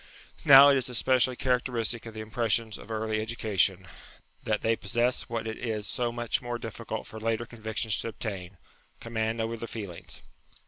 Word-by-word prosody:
Now 140 Hz, -1 st, +10 dB
it 140 Hz, -, +5 dB
is 130 Hz, -1 st, 0 dB
especially 125 Hz, +1 st, +2 dB
cha 130 Hz, -, -4 dB
racteristic 120 Hz, -2 st, 0 dB
of 110 Hz, -, -9 dB
the 110 Hz, -, -5 dB
impressions 110 Hz, 0 st, -1 dB
of -, -, -12 dB
early 110 Hz, -1 st, -1 dB
education, 100 Hz, -4 st, +1 dB, 0.6 s
that 110 Hz, -1 st, -1 dB
they 115 Hz, 0 st, +2 dB
possess 120 Hz, +2 st, 0 dB
what 115 Hz, -1 st, -3 dB
it 110 Hz, -, -5 dB
is 110 Hz, -4 st, -2 dB
so 120 Hz, +3 st, 0 dB
much 120 Hz, -1 st, -1 dB
more 120 Hz, -1 st, -3 dB
difficult 115 Hz, -3 st, -6 dB
for 110 Hz, -, -9 dB
later 115 Hz, +1 st, -1 dB
convictions 110 Hz, -1 st, -1 dB
to -, -, -3 dB
obtain 100 Hz, -4 st, -5 dB, 0.4 s
command 115 Hz, 0 st, -2 dB
over 115 Hz, +1 st, -2 dB
the 115 Hz, -, -6 dB
feel 105 Hz, -6 st, -6 dB
ings. 85 Hz, -5 st, -8 dB
115 Hz, 180 wpm, -28 LUFS, 110-120 Hz, 0.6 s, Now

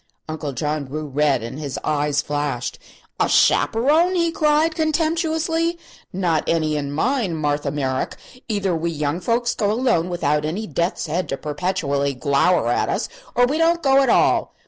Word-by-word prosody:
Uncle 155 Hz, -2 st, -4 dB
John 150 Hz, +3 st, -2 dB
grew 150 Hz, +3 st, -5 dB
red 145 Hz, -3 st, +1 dB
and 125 Hz, +5 st, -6 dB
his 145 Hz, -3 st, -5 dB
eyes 145 Hz, -1 st, 0 dB
flashed. 145 Hz, -4 st, -3 dB, 0.4 s
"A -, -, +2 dB
chaperone!" 310 Hz, +11 st, +3 dB
he 335 Hz, -2 st, +1 dB
cried, 310 Hz, +1 st, +2 dB
contemptuously; 325 Hz, +1 st, 0 dB, 0.3 s
"not 175 Hz, -4 st, 0 dB
any 155 Hz, -2 st, +1 dB
in 140 Hz, -1 st, -3 dB
mine, 215 Hz, -, 0 dB
Martha 145 Hz, -2 st, -1 dB
Merrick. 135 Hz, -2 st, -2 dB, 0.3 s
Either 200 Hz, -4 st, 0 dB
we 165 Hz, +1 st, -1 dB
young 150 Hz, 0 st, -2 dB
folks 235 Hz, +4 st, 0 dB
go 205 Hz, -, 0 dB
alone, 220 Hz, -7 st, +1 dB
without 150 Hz, -4 st, 0 dB
any 175 Hz, +9 st, -3 dB
death's 170 Hz, +1 st, -2 dB
head 170 Hz, +4 st, -2 dB
to 135 Hz, -, -2 dB
perpetually 145 Hz, -3 st, -1 dB
glower 140 Hz, +2 st, +2 dB
at 120 Hz, -, +1 dB
us, -, -, -1 dB, 0.3 s
or 245 Hz, +1 st, +5 dB
we 290 Hz, +6 st, -1 dB
don't 335 Hz, +1 st, +2 dB
go 270 Hz, 0 st, +5 dB
at 270 Hz, -, +2 dB
all! -, -, +2 dB
165 Hz, 165 wpm, -21 LUFS, -, 0.4 s, or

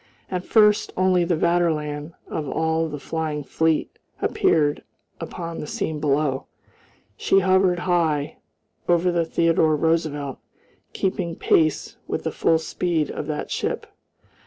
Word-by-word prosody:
At 185 Hz, -1 st, -3 dB
first 210 Hz, -2 st, +4 dB
only 185 Hz, -1 st, +3 dB
the 170 Hz, -1 st, +1 dB
Vaterland 155 Hz, -3 st, 0 dB
of 150 Hz, -3 st, -4 dB
all 160 Hz, +1 st, 0 dB
the 150 Hz, -, -5 dB
flying 155 Hz, 0 st, -3 dB
fleet 160 Hz, +2 st, 0 dB, 0.2 s
appeared 145 Hz, -2 st, +1 dB, 0.4 s
upon 170 Hz, -1 st, -6 dB
the 150 Hz, -, -5 dB
scene 155 Hz, 0 st, -3 dB
below. 145 Hz, -2 st, 0 dB, 0.7 s
She 195 Hz, -, +3 dB
hovered 185 Hz, -1 st, +3 dB
high, 160 Hz, -5 st, 0 dB, 0.5 s
over 175 Hz, +1 st, +3 dB
the 170 Hz, -1 st, +1 dB
Theodore 165 Hz, -1 st, +2 dB
Roosevelt, 150 Hz, -3 st, -1 dB, 0.5 s
keeping 185 Hz, -3 st, -2 dB
pace 155 Hz, -2 st, +1 dB
with -, -, -3 dB
the -, -, -2 dB
full 165 Hz, -, +2 dB
speed 160 Hz, -1 st, -1 dB
of 150 Hz, -, -5 dB
that 150 Hz, -1 st, -4 dB
ship. -, -, -2 dB
160 Hz, 130 wpm, -23 LUFS, 150-175 Hz, 0.7 s, first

